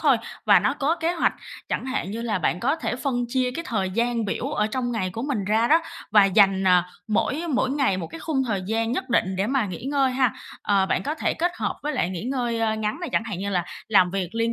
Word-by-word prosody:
thôi, - - +4 0.3
và - - +7
nó - - +1
có 310 +5 0
kế 330 +1 0
hoạch. 330 - +2 0.4
Chẳng - - -2
hạn 200 -7 -2
như 230 +2 -4
là 215 -4 -1
bạn 180 +1 0
có 275 +6 +1
thể 285 -6 -3
phân 250 -3 -1
chia 255 0 0
cái 335 +7 -5
thời 195 -5 -1
gian 235 +2 0
biểu 200 - -3
ở 210 - +1
trong 245 +1 -2
ngày 185 -5 -1
của 225 +5 -5
mình 260 -8 -2
ra 220 +4 +2
đó, 325 +2 +5 0.3
và 205 -2 +7
dành, 195 -1 +4
à, 180 -1 +4 0.2
mỗi 270 +9 0
mỗi 255 +1 +1
ngày 270 -9 +1
một 170 -3 -4
cái 330 - -10
khung 280 -5 0
thời 200 -4 -1
gian 225 +2 0
nhất 260 +1 -3
định 190 -5 +1
để 195 +2 0
mà 260 -4 +1
nghỉ 185 +5 -7
ngơi 275 -1 +2
ha. 255 -3 +2 0.3
Ờ, 195 -2 +2
bạn - - 0
có 295 +3 -2
thể - - -1
kết 350 +2 0
hợp - - -2
với 300 +1 -2
lại 180 - 0
nghỉ 180 0 -5
ngơi 235 -4 0
ngắn 215 +7 -2
này, 350 - -3
chẳng 225 - +1
hạn 210 -6 -5
như 200 +2 -3
là 180 -3 0 0.2
làm 185 -5 +5
việc 190 -2 -2
liên 230 0 +1
230 Hz, 260 wpm, -24 LUFS, 195-265 Hz, 0.4 s, và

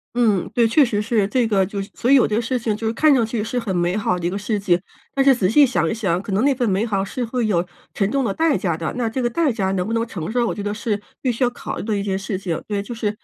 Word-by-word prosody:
嗯， 215 -7 +2
对， 235 -2 +4
确 285 +7 +5
实 230 -5 0
是。 215 -2 +1
这 245 +3 +1
个 200 -3 +2
就 200 +2 -5
所 240 - -2
以 275 - +7
有 260 - +5
的 215 +2 0
事 250 +2 -1
情 225 -3 -1
就 220 +1 -3
是 220 - 0
看 305 +4 +4
上 255 -4 +3
去 225 -1 -2
是 230 +3 -2
很 210 -6 -3
美 175 +1 +1
好 205 -4 0
的 175 - -5
一 - - +2
个 185 - -4
事 205 +1 -1
情。 180 -3 +2 0.3
但 275 - +2
是 270 -1 +6
仔 195 -6 +1
细 285 +7 +6
想 175 -9 0
一 - - -1
想， 195 -6 0
可 200 +2 -7
能 195 +4 +1
那 280 0 +4
份 245 -2 0
美 195 +1 +1
好 200 -4 -1
是 245 +5 -4
会 240 0 -1
有 180 -5 +1 0.3
沉 195 -1 0
重 275 +3 0
的 200 - 0
代 320 +1 +2
价 175 -7 -1
的， 165 0 -3
那 240 -2 0
这 225 +4 -2
个 240 - +1
代 300 +4 +1
价 195 -5 -1
能 180 -2 -1
不 225 - -3
能 230 0 +1
承 175 -4 -5
受， 240 0 +1
我 - - -2
觉 205 - -5
得 205 0 -2
是 210 -1 -2 0.2
必 255 - +1
须 240 +3 -1
要 245 - +3
考 - - -6
虑 - - -4
的 215 0 -1
一 200 - -1
件 195 -1 -1
事 195 0 -4
情。 175 -4 -3
对， 205 -1 -1
就 235 +4 -7
是 220 -2 -1
220 Hz, 350 characters per minute, -21 LUFS, 195-240 Hz, 0.3 s, 以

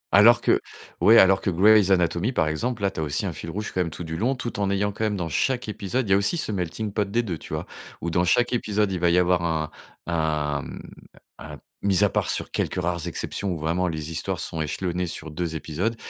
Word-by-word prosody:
Alors 115 +4 +7
que - - +3 0.4
ouais, 110 +6 +7
alors 95 -1 +6
que - - 0
Grey's 100 +3 +5
Anatomy, 90 +4 +2
par 80 - +1
exemple, 110 +8 -2
là, 100 - +2
tu - - -7
as - - 0
aussi 75 -2 -1
un - - -2
fil 85 - -7
rouge 105 +6 -4
quand - - -2
même 85 - -1
tout 85 - -7
du 80 -1 -5
long, 120 +10 0
tout 120 -4 -5
en 100 -1 +1
ayant, 100 +1 0
quand 110 +2 -3
même, 105 -1 0
dans 85 - -2
chaque 125 - 0
épisode 105 +4 -2
il - - -2
y - - +7
a 95 - +6
aussi 100 +12 +1
ce 155 - -2
melting 100 +2 -3
pot 105 -2 -1
des 120 +4 +1
2, 90 -8 -4
tu - - -12
vois? - - -4 0.4
Où 85 - -2
dans 90 +1 +2
chaque 120 +8 +2
épisode, 105 -3 0
il 90 - -2
va 85 0 +3
y 85 - +3
avoir 90 -1 +3
un 80 -2 -1 0.3
un, 75 -3 -1
mmh, - - -8 0.6
un - - -9 0.2
mis 100 0 +3
à 105 - +4
part - - -1
sur - - 0
quelques - - -1
rares 85 -1 -2
exceptions 95 +3 -3
où 85 - -2
vraiment 85 +4 0
les 80 -2 -4
histoires 80 - -3
sont 80 - -2
échelonnées 90 +3 -2
sur 80 -2 -6
2 80 +1 -3
épisodes, 85 +9 -2
90 Hz, 255 wpm, -24 LUFS, 80-105 Hz, 0.6 s, Alors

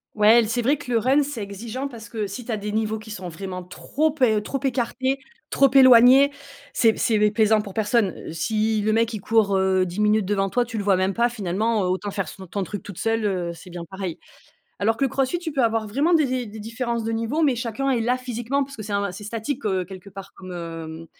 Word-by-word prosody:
Ouais 215 +1 +6
et - - +8
l 225 - -1
c'est 240 +2 0
vrai 275 +6 +2
que 250 - -8
le 230 - +3
run 270 +6 +3
c'est 275 -5 -5
exigeant 220 +7 -5
parce 230 -4 -10
que 215 -3 -3
si 210 +5 -7
tu 240 - -5
as 220 - 0
des 210 0 -4
niveaux 220 0 -1
qui 220 - -12
sont 185 -4 -6
vraiment 185 +1 -6
trop 290 - -1
pe 250 -8 +2
trop 270 +6 -3
écartés, 260 +1 0 0.3
trop 275 -2 +4
éloignés, 260 +1 +7 0.4
c'est 225 -3 +3
c'est, 220 - +2
beh, 210 0 +3
plaisant 215 0 +3
pour 200 -2 -9
personne. 215 -3 +1
Heu, - - -5
si 215 +6 0
le 215 +1 +2
mec 230 +1 +2
il 215 - -5
court, 210 -2 +2
heu, 190 -1 +2
10 180 +4 -6
minutes 210 -1 +3
devant 195 -1 0
toi, 245 -1 +1
tu 235 -2 -6
le 205 - -2
vois 195 -2 +3
même 190 +1 0
pas 235 +1 +3
finalement, 215 0 -1
heu, 180 - 0
autant 190 +2 -2
faire 195 -1 -3
son 190 - -10
ton 195 +3 -4
truc 205 +2 -6
toute 200 -4 -9
seule, 225 -1 0
heu, 180 -4 -1
c'est 180 +2 -13
bien 170 -1 -7
pareil. 190 -2 -6 0.6
Alors 220 +3 +2
que 275 - +1
le - - +2
CrossFit 270 +6 0
tu 335 -2 -5
peux 275 -3 +1
avoir 225 -1 +1
vraiment 290 +11 +1
des 310 -3 +4
des 255 -1 -2
des 215 +1 -10
différences 230 +1 -3
de 225 - -2
niveau 230 +8 -1
mais 275 -4 +3
chacun 240 +3 -2
est 245 -3 +1
là 245 +3 +1
physiquement 255 +2 -2
parce 275 +1 -12
que 215 - -6
c'est 210 0 -6
un 200 -2 -1
c'est 195 - -9
statique, 230 +6 -4
heu, 190 -3 0
quelque 190 +2 -11
part 195 0 -10
comme, 185 -1 -11
hem, 165 -1 -7
220 Hz, 260 wpm, -23 LUFS, 195-245 Hz, 0.6 s, et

